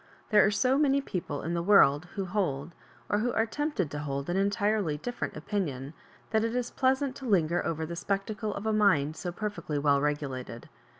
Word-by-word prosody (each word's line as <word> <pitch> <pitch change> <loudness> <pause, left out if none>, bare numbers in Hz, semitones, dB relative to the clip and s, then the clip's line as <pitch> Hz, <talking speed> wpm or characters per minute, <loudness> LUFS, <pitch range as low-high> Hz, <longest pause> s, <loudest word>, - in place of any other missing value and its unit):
There 210 -2 +7
are - - +4
so 255 +7 +2
many 280 -2 +3
people 175 - -4
in 165 - -2
the 170 - 0
world 170 -5 +5
who 195 - -2
hold, 175 -5 -2 0.3
or 205 - +1
who 245 +3 0
are 225 - +2
tempt 295 +2 -3
ed 155 -6 -3
to 145 - -4
hold, 140 +2 -3
an - - -1
entirely 200 -4 +1
different 245 +3 -4
opinion, 150 -6 -3 0.4
that 220 -1 +2
it 230 +1 -1
is 245 -1 -1
pleasant 265 0 +1
to 270 - -9
linger 175 -6 +2
over 160 -1 -2
the 170 +2 -6
spectacle 205 +4 -2
of 200 - -6
a 220 - +1
mind 160 -9 +3
so 175 +2 -4
perfectly 175 -6 -4
weU 140 -1 +3
regulated. 135 -5 -3
195 Hz, 200 wpm, -29 LUFS, 150-220 Hz, 0.4 s, There